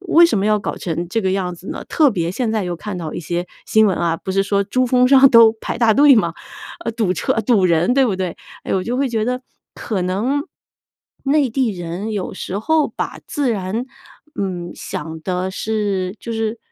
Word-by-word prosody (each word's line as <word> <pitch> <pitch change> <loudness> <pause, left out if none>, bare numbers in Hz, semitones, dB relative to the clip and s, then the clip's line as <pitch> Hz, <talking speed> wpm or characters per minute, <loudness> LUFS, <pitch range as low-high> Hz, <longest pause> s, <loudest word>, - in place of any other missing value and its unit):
为 345 -3 +5
什 265 -11 0
么 195 - 0
要 215 0 +3
搞 - - -4
成 170 0 -3
这 225 +4 0
个 190 -1 0
样 185 -2 -1
子 175 +3 -12
呢？ - - -5
特 300 -4 +4
别 170 -4 -1
现 225 +3 -2
在 215 -2 0
又 175 -1 -3
看 200 +2 -6
到 160 -3 -5
一 - - -4
些 175 +2 -3 0.2
新 220 0 +4
闻 190 - +1
啊， 170 -1 0
不 190 - -6
是 195 - +2
说 200 0 +1
珠 255 +5 0
峰 250 0 +3
上 270 0 +8
都 230 -2 +8
排 - - -4
大 230 -2 +4
队 285 -1 +7
吗？ 170 -8 +1 0.5
呃， 230 - -2
堵 220 -5 0
车 - - 0
堵 210 -3 +3
人， 170 +5 +2
对 270 -2 +4
不 205 - 0
对？ 185 -2 -3 0.3
哎， - - -3
我 185 - 0
就 245 +2 -2
会 275 -1 +1
觉 220 -2 -1
得 250 +1 -2 0.3
可 200 -5 -3
能 230 - -1 0.8
内 275 -2 +2
地 250 -1 +1
人 180 +4 -5
有 200 -3 -4
时 190 +2 -4
候 310 +6 +2
把 - - -5
自 285 -4 -1
然， 215 +4 -2 0.5
嗯， 180 -3 -3
想 160 -4 -6
的 185 +1 -2
是 200 -2 -2
就 235 - -7
是， 225 0 -2
210 Hz, 235 characters per minute, -19 LUFS, 185-245 Hz, 0.8 s, 上